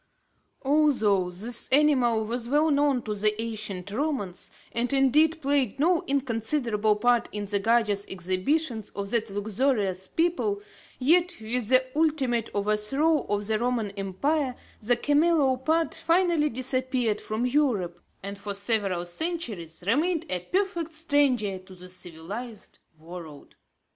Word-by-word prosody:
Although 265 -11 +3
this 215 +7 -2
animal 255 -6 +4
was 235 +1 -4
well 300 +3 +3
known 280 -3 +2
to 215 - -3
the 210 +1 0
ancient 215 -4 -4
Romans, 230 - -2 0.2
and 240 +2 -1
indeed, 300 +4 +4
played 275 -4 +1
no 335 +3 +3
inconsiderable 230 -4 +1
part 240 +2 +2
in 210 -1 -4
the 200 0 -1
gorgeous 210 -2 +2
exhibitions 210 - -1
of 200 0 -4
that 230 -2 +1
luxurious 205 -2 -1
people, 350 - 0 0.4
yet, 345 +6 +3
with 225 +1 -2
the 255 0 +5
ultimate 275 -8 +1
overthrow 215 +10 +1
of 205 0 0
the 215 0 0
Roman 235 -4 -1
Empire, 250 +9 -1 0.3
the 240 +3 +2
camelopard 300 +1 +2
finally 335 -3 +2
disappeared 255 -3 -1
from 220 +3 -2
Europe, 240 - +1 0.2
and 200 0 -6
for 200 0 -5
several 200 -4 0
centuries 200 - -4
remained 310 - +1
a 180 - 0
perfect 340 - -2
stranger 275 - +2
to 185 0 -15
the 180 0 -12
civilised 185 +6 -7 0.2
world. 160 -3 -10
235 Hz, 130 wpm, -26 LUFS, 205-290 Hz, 0.4 s, the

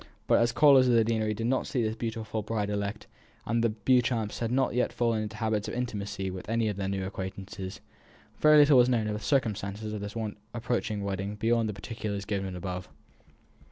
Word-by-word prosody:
But - - +4
as 120 0 +3
callers 135 -1 +6
at 120 - +4
the 115 - +5
deanery 110 -1 0
did 115 +2 -3
not 130 +2 0
see 125 - 0
this 110 0 -1
beautiful 110 -1 -3
bride 105 -1 -2
elect, 100 +1 -3 0.4
and 115 +1 0
as - - +2
the 115 - +3
Beauchamps 115 0 +1
had 115 -1 -1
not 130 +1 +2
as - - -6
yet 125 - +2
fallen 115 -2 0
into 110 0 -5
habits 110 -2 -1
of - - -4
intimacy 100 -5 -3
with 95 +2 -8
any 115 -1 +1
of 100 - -4
their 95 -1 -2
new 95 -1 -2
acquaintances, 95 0 -6 0.6
very 155 0 +7
little 145 -3 +7
was 125 0 +5
known 115 -4 +1
of 105 - -1
the 105 - -3
circumstances 105 -3 -1
of 105 - -4
this 105 +1 -6 0.4
approaching 115 -3 -2
wedding 100 +1 -3
beyond 115 +1 +1
the - - -3
particulars 100 -1 -5
given 95 -3 -3
above. 90 0 -5
110 Hz, 210 wpm, -28 LUFS, 100-115 Hz, 0.6 s, very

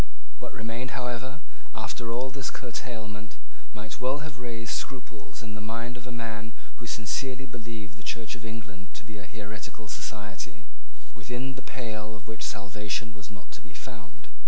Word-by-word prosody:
What - - 0
remained, 115 +3 +1
however, 125 +4 +2 0.3
after 115 +1 +2
all 125 +3 +4
this 135 0 +2
curtailment, 110 -5 -1 0.3
might 110 +1 -2
well 135 +4 +6
have 140 -5 -3
raised 115 -2 +2
scruples 125 -2 -1
in 110 -1 -1
the 110 - -1
mind 115 +3 +2
of 125 0 -4
a - - -1
man 115 -2 0 0.2
who 120 - -3
sincerely 130 +4 +4
believed 110 -4 -2
the - - -8 0.2
Church 110 -1 0
of 115 - -3
England 100 -5 -3
to 105 - -3
be 105 -1 -4
a 95 - -5
heretical 110 0 -2
society, 105 0 -1 0.5
within 125 +2 +1
the 135 - -3
pale 110 -5 0
of 105 -1 -7
which 110 -1 -2
salvation 105 +2 +3
was 100 -3 -6
not 100 -4 -8
to - - -4
be - - -10
found. - - -6
115 Hz, 170 wpm, -34 LUFS, 105-125 Hz, 0.5 s, well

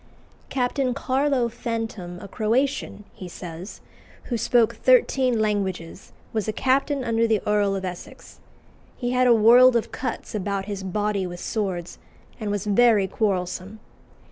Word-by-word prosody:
"Captain 255 0 0
Carlo 270 -2 +1
Fantom, 225 -6 -5
a 200 - -8
Croatian," 235 +2 -1
he 185 - -9
says, 175 +2 -9 0.4
"who 245 - -3
spoke 230 0 +2
thirteen 265 - +3
languages, 195 -5 -2 0.2
was 220 -2 -1
a - - +1
captain 270 +4 +1
under 230 -1 +1
the 220 -2 +2
Earl 205 -1 +2
of 190 -1 -4
Essex. 180 -1 -9 0.6
He 245 -1 -2
had 250 0 +3
a 240 - +6
world 240 +3 +7
of 235 - 0
cuts 255 - -5
about 200 -1 -2
his 200 -1 -5
body 200 0 -1
with 175 0 -8
swords, 185 -6 -3 0.4
and 215 -2 -3
was 205 0 -2
very 210 -1 +4
quarrelsome. 190 0 -2
215 Hz, 140 wpm, -24 LUFS, 195-245 Hz, 0.6 s, world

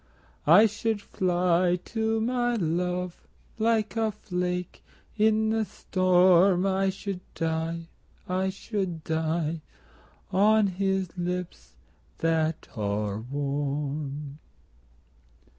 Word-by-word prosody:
I 180 +8 +8
should 220 0 -1
fly 180 -2 +1
to 225 -1 0
my 240 +1 +1
love 180 -1 -1 0.4
Like 220 -1 +1
a 220 -1 +1
flake 180 -3 -4 0.3
in 220 0 +3
the 225 0 +1
storm, 185 -1 +3
I 195 0 +2
should 195 0 -4 0.2
die, 165 0 -2 0.4
I 185 +1 0
should 190 -4 -4
die, 160 0 -1 0.7
On 215 +2 +4
his 190 -1 -1
lips 175 - -4 0.4
that 160 -1 0
are 105 -1 -2
warm. 140 +2 -3
180 Hz, 90 wpm, -27 LUFS, 160-200 Hz, 0.7 s, I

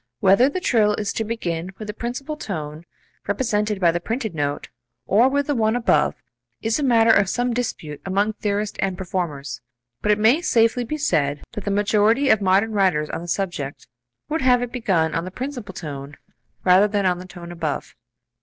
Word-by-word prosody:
Whether 195 +8 +5
the 370 - -3
trill 215 - +2
is 205 -1 -2
to 225 - -1
begin 185 -5 -3
with 215 - -7
the 210 - -4
principal 250 +7 -4
tone 160 - -6 0.4
(represented 210 -1 0
by 175 -3 +4
the 175 - -1
printed 225 +3 -3
note) 145 -2 -2 0.4
or 225 - +4
with 285 +1 0
the 290 - 0
one 220 -2 +1
above 245 0 +2 0.4
is 225 +4 0
a - - -1
matter 230 -3 +5
of 200 -3 +4
some 245 +2 0
dispute 190 -11 -4
among 200 +3 0
theorists 205 0 -2
and 190 -2 -1
performers, 150 -9 -4 0.4
but 210 - +2
it 210 - +3
may 225 +9 +4
safely 230 -5 +2
be 305 +6 -4
said 150 - 0
that 210 -4 -7
the - - -1
majority 210 +6 +3
of 215 - +4
modern 195 +3 +3
writers 185 -7 +1
on 165 - -4
the 175 - -8
subject 175 -7 -3 0.4
would 320 +2 -1
have 250 -1 +4
it 245 - -5
begin 185 -10 0
on 165 - -1
the 185 - -5
principal 245 0 -6
tone 145 -5 -7 0.5
rather 185 +3 +6
than 205 -1 -1
on 180 -1 +1
the 185 - -9
tone 175 -1 -10
above. 165 -4 -4
205 Hz, 190 wpm, -22 LUFS, 175-235 Hz, 0.5 s, rather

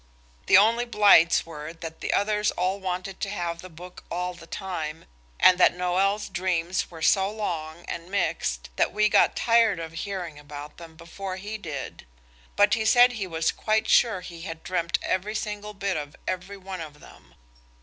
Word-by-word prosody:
The 190 - +8
only 230 +4 +4
blights 205 -7 +5
were 155 -1 -8
that 165 -1 -9
the - - -1
others 210 +1 +1
all 185 +2 -1
wanted 185 0 -4
to 200 - -2
have 170 -4 -3
the 185 - -10
book 175 +2 -12
all 180 +1 -2
the 170 -1 -14
time, 165 -6 -5 0.3
and 185 0 +6
that 180 - +5
Noël's 190 +3 0
dreams 180 -1 -1
were 165 -2 -9
so 195 0 +4
long 170 -6 -5
and 170 +1 -6
mixed 155 - -1
that - - +2
we 215 +2 +2
got - - +4
tired 230 -5 +3
of 165 -1 -6
hearing 175 -3 -5
about 145 0 -10
them 165 -1 -12
before 185 +3 -7
he 210 +3 -6
did. 145 - -7 0.5
But 205 0 +4
he 220 - +1
said 245 +3 +6
he 215 -6 -4
was 165 -2 0
quite 215 0 0
sure 220 -6 +4
he 170 -2 -10
had 165 -2 -7
dreamed 170 -2 0
every 200 +4 -1
single 210 -1 -4
bit 195 -1 -2
of 145 -1 -6
every 185 +2 -4
one 190 -2 -7
of 150 -2 -9
them. - - -17
180 Hz, 180 wpm, -26 LUFS, 165-200 Hz, 0.5 s, The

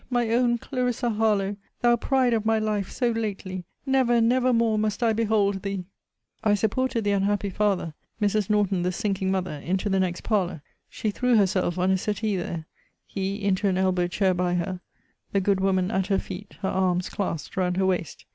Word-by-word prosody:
my 240 -3 +1
own 240 0 +3
Clarissa 250 -1 -1
Harlowe! 210 -2 +1 0.3
thou 240 0 +5
pride 255 0 +2
of 220 -2 +1
my 220 0 +2
life 210 -3 -1
so 245 -2 0
lately! 195 -5 -4 0.2
never, 260 -3 +3
never 250 +2 +3
more 230 -2 +2
must 215 +2 -1
I 225 -1 +3
behold 210 -3 +1
thee! 195 -2 -4 0.6
I 210 -1 +4
supported 230 +3 0
the 205 - +1
unhappy 200 0 0
father, 195 -5 0 0.3
Mrs. 210 -1 +1
Norton 205 -3 +2
the 180 +1 0
sinking 195 -1 -1
mother, 185 -6 -2
into 190 +4 -1
the 195 -1 +2
next 180 -2 -1
parlour. 185 -8 0 0.3
She 215 - -2
threw 250 +3 +2
herself 185 -4 +2
on 185 +1 +2
a 190 - +2
settee 210 +1 -1
there; 170 -3 -4 0.4
he 195 +1 -3
into 200 0 +1
an 185 -1 +1
elbow 185 -2 +2
chair 185 +1 +1
by 180 0 0
her 180 +1 -2 0.5
the 200 - +3
good 195 0 +1
woman 190 0 +1
at 190 -2 0
her 195 - +2
feet, 190 +2 -7
her 190 - 0
arms 185 -1 +1
clasped 165 -7 -4
round 180 -1 0
her 190 - +2
waist. 180 -4 -2
200 Hz, 190 wpm, -25 LUFS, 185-220 Hz, 0.6 s, thou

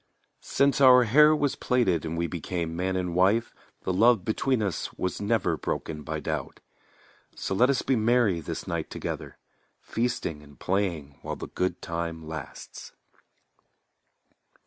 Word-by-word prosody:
Since 140 0 +1
our 125 -2 +8
hair 150 +7 +6
was 145 -2 0
plaited 95 -11 +1
and 80 +1 -3
we 85 - 0
became 85 0 -4
man 95 +2 -1
and 90 -2 -2
wife 95 +6 +2 0.3
The 95 - -1
love 110 0 +4
between 115 +1 0
us 100 -5 -3
was 90 +2 -3
never 105 0 +1
broken 75 -1 -4
by - - -4
doubt. - - -4 0.8
So - - -3
let 125 +7 +4
us 140 - +1
be 135 - +2
merry 110 -5 +2
this - - -6
night - - -3
together, - - -6 0.4
Feasting 115 -10 -2
and 75 -1 -17
playing 85 -8 -2
while - - -4
the - - -8
good 90 0 -2
time 85 -1 -4
lasts. 80 -3 -8
95 Hz, 145 wpm, -27 LUFS, 85-120 Hz, 0.8 s, our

